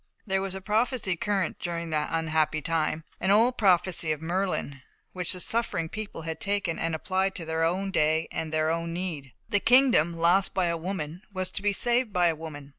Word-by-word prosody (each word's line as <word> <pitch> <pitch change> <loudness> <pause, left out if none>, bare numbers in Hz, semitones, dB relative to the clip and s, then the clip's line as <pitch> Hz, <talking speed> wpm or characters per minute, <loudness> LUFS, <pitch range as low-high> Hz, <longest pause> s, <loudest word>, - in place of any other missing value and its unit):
There 195 -2 0
was 195 -1 -2
a 190 - -6
prophecy 215 -1 0
current 195 -1 -1
during 170 -1 -4
that 150 -1 0
unhappy 160 -1 +1
time 160 0 -1 0.2
an 190 - -1
old 230 +5 +4
prophecy 180 -5 +3
of 155 - -2
Merlin 170 -5 -2 0.3
which 180 -2 -2
the 180 - -3
suffering 185 -6 -1
people 215 -5 -6
had 160 0 -4
taken 200 -5 -1
and 165 -1 -1
applied 190 +3 -1
to 165 - -5
their 160 0 -1
own 190 +4 0
day 160 -1 +2
and 160 -1 -3
their 155 0 +1
own 165 0 -2
need. 165 -7 -4 0.2
"The 205 - +2
kingdom, 245 - +5
lost 175 +4 +2
by 185 - +2
a 170 -1 0
woman, 165 -1 -5
was 185 -2 -2
to - - -3
be 205 0 +2
saved 240 +3 +2
by 180 -3 +3
a 165 - -1
woman." 150 -3 -9
175 Hz, 200 wpm, -27 LUFS, 160-195 Hz, 0.3 s, kingdom